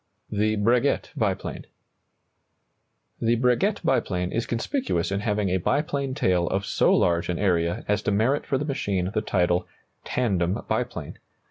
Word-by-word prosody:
THE 110 +1 +1
BREGUET 120 +6 +1
BIPLANE. - - -2 1.5
The 115 +1 +3
Breguet 125 - +1
biplane 90 -9 0
is 115 - -2
conspicuous 120 - -1
in 100 - 0
having 105 -2 0
a 95 - +2
biplane 140 - -1
tail 90 -9 +2
of 95 +1 -1
so - - +2
large 85 0 +2
an 90 - 0
area 85 -3 0
as 105 0 +1
to 105 - -1
merit 115 +8 +1
for 135 - +1
the 145 - -2
machine 100 -10 -1
the 110 - +1
title 90 -3 +1 0.4
"tandem 95 -7 0
biplane." - - -3
105 Hz, 145 wpm, -25 LUFS, 90-125 Hz, 1.5 s, The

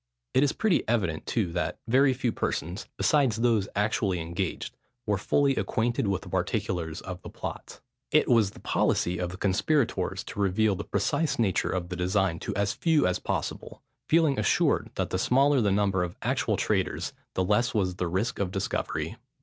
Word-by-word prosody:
It 130 - +4
is 145 0 +3
pretty 215 -5 +1
evident, 95 -9 0
too, 105 -8 0
that 85 +1 -2
very 135 +4 +4
few 125 -2 0
persons, 90 -2 -3
besides 140 -7 +3
those 115 -3 +2
actually 105 -3 +1
engaged, 85 +2 -4 0.3
were 105 -3 0
fully 140 +5 +2
acquainted 120 -3 0
with 95 -2 -1
the - - -10
particulars 85 -3 -2
of 90 -1 -7
the - - -9
plot. - - -7 0.3
It - - +3
was 115 -5 +4
the - - -14
policy 90 +1 +1
of 90 -1 -2
the 95 - -8
conspirators 110 +9 0
to - - -8
reveal 100 +2 +2
the 95 - -4
precise 165 -2 0
nature 105 -5 +1
of 90 -2 -2
the 90 - -4
design 90 -1 0
to - - -4
as 100 0 +1
few 160 -3 +2
as 90 0 +1
possible, - - -4 0.3
feeling 155 -4 +3
assured - - +2
that - - -2
the - - 0
smaller 135 +1 +3
the 105 - +2
number 100 -1 +2
of 90 -1 -5
actual - - 0
traitors - - -1 0.2
the 95 - +1
less 110 +5 +1
was 90 -4 0
the 90 - -1
risk 95 +7 -1
of 100 -2 0
discovery. 95 +1 -3
100 Hz, 180 wpm, -27 LUFS, 90-120 Hz, 0.3 s, It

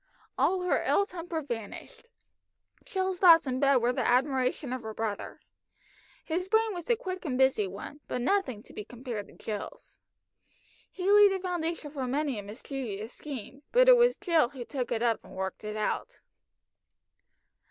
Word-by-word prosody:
All 370 0 +2
her 360 - +1
ill 400 - +3
temper 340 -4 -5
vanished. 235 - -7 0.8
Jill's 375 -1 -2
thoughts 335 -4 +8
in 260 -1 -2
bed 275 0 +4
were 245 0 +2
the - - -1
admiration 260 +1 +1
of 255 - -4
her 220 -1 -7
brother. 220 -2 -4 0.9
His 360 +3 -2
brain 440 0 +3
was 350 -3 -7
a 475 - +5
quick 375 -5 -6
and 270 -7 -2
busy 265 -6 +3
one, 200 +10 -8
but - - -2
nothing 260 - 0
to - - -16
be 210 - -6
compared 235 -2 -6
to - - -17
Jill's. 210 -2 -7 0.9
He 370 0 -5
laid 415 -1 +8
the 385 - -1
foundation 335 -4 -3
for 270 -3 -3
many 275 -2 -1
a - - -4
mischievous 220 0 -6
scheme, 275 -1 -8
but - - +5
it - - +10
was 485 +1 +4
Jill 330 -8 +2
who 255 -3 -8
took 255 -2 -4
it 230 -1 0
up 230 -2 +1
and - - -13
worked 190 +1 -4
it 210 0 -4
out. 350 - -3
275 Hz, 175 wpm, -29 LUFS, 235-365 Hz, 0.9 s, it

